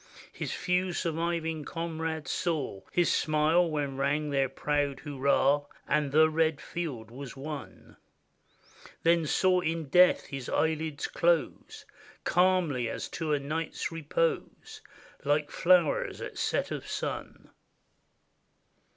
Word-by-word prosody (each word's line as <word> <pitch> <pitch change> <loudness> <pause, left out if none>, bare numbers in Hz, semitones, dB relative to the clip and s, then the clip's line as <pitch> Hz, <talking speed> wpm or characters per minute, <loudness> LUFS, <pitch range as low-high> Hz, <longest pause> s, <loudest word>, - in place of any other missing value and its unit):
His - - -4
few 180 0 0
surviving 165 -1 -1
comrades 160 -2 -4
saw 150 - -2
His 175 -1 +2
smile 155 +3 +3
when 145 -3 -2
rang 145 +2 0
their 135 -2 +2
proud 145 0 -1
hurrah, 140 0 +2 0.2
And 145 -2 +1
the 155 +2 +6
red 160 -1 +1
field 130 -10 -5
was 135 +2 -8
won; 140 -2 -8 1.1
Then 165 -1 +3
saw 185 +4 +3
in 165 -4 -2
death 180 +5 +5
his 135 -3 -6
eyelids 160 -2 0
close 170 -1 0 0.4
Calmly, 175 -9 +2
as - - -5
to 160 -2 -3
a 145 - +2
night's 155 +5 -3
repose. 165 +1 -2 0.4
Like 145 +1 +1
flowers 175 -3 +3
at - - -6
set - - 0
of - - -5
sun. - - -5
155 Hz, 115 wpm, -29 LUFS, 140-165 Hz, 1.1 s, the